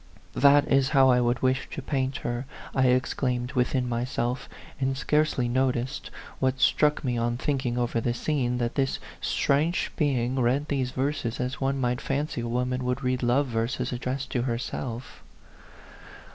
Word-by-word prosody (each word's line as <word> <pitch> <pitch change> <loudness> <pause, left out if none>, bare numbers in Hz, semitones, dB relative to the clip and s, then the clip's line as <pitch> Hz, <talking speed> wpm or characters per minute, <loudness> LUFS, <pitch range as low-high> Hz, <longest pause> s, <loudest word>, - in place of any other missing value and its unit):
" - - -29
That 145 +1 +7
is 135 -1 +3
how 135 -1 +7
I 125 0 +4
would 120 +1 0
wish 130 +1 +1
to - - -6
paint 135 -1 -1
her 120 +2 -2
!" - - -14
I 130 -1 +3
exclaimed 125 0 0
within 125 0 +1
myself; 120 +1 -2 0.3
and 135 0 0
scarcely 150 -4 +1
no 130 +2 +2
ticed, 130 +3 -4 0.3
what 130 0 +1
struck 150 +1 +3
me 125 -3 0
on 120 +1 0
thinking 130 -3 -1
over 120 -1 0
the 120 +1 -1
scene, 125 -3 0
that 120 -1 -1
this 135 -1 0 0.2
strange 155 +5 +1
being 130 -4 +1
read 130 +4 +1
these 135 -3 0
verses 130 -3 -2
as 125 +2 -3
one 135 0 0
might 125 -1 0
fancy 140 -2 -2
a 120 - -3
woman 125 +2 -1
would 125 +2 -1
read 125 0 0
love 125 +4 +3
verses 120 +1 -2
addressed 130 +2 -3
to 125 - 0
herself. 120 0 -4
130 Hz, 175 wpm, -27 LUFS, 120-135 Hz, 0.3 s, That